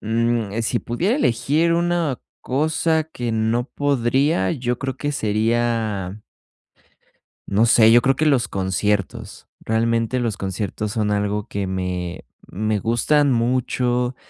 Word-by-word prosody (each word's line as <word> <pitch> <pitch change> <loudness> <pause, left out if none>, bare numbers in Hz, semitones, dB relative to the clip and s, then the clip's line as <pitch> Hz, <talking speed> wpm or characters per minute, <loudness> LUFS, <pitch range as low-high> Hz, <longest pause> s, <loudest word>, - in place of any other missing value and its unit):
mm, 115 -1 0
eh, 115 - -1
si 120 +1 -1
pudiera 175 - -1
elegir 160 - +1
una 170 -5 0 0.2
cosa 155 +3 0
que 125 -7 -5
no 110 +2 +1
podría, 135 - +1
yo 125 -1 -2
creo 135 -1 -3
que 145 0 -2
sería 110 -3 -1 1.3
no 105 +4 +3
sé. 115 -1 +6
Yo 120 +1 +7
creo 135 +1 +2
que 155 - 0
los 140 -6 +3
conciertos, 100 +1 -2
realmente 115 +2 0
los 115 -4 -2
conciertos 100 +2 -3
son 105 -2 0
algo 105 0 -1
que 100 -1 -3
me, 90 -1 -4 0.2
me 110 +2 -1
gustan 135 +6 +2
mucho. 125 +1 0
115 Hz, 130 wpm, -21 LUFS, 105-130 Hz, 1.3 s, Yo